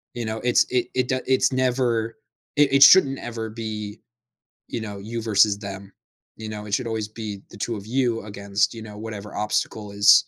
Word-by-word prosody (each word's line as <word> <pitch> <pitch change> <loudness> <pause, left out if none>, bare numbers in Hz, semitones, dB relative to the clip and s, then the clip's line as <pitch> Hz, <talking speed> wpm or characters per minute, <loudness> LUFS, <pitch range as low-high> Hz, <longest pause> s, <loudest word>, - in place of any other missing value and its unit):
You 120 - -3
know, 110 0 -3
it's 125 -1 +4
it 125 -1 +1
it 130 -1 0
d 130 - +1
it's 130 0 +3
never 125 -3 0 0.4
it 145 -2 +4
it 140 0 +8
shouldn't 140 -6 +7
ever 115 -2 -5
be, 110 -1 -6 0.7
you 120 - -4
know, 105 -2 -6
you 115 +3 -5
versus 105 -2 +4
them, 100 -1 -8 0.4
you 110 0 -7
know? 105 -1 -6
It 100 - -1
should 125 -1 -1
always 110 -2 -2
be 105 -2 -7
the - - -12
2 115 +3 -3
of 100 0 -9
you 120 -1 0
against, 100 0 -1
you 115 - -8
know, 105 -1 -10
whatever 105 -2 -7
obstacle 105 0 -2
is 100 0 +7
110 Hz, 200 wpm, -24 LUFS, 105-120 Hz, 0.7 s, it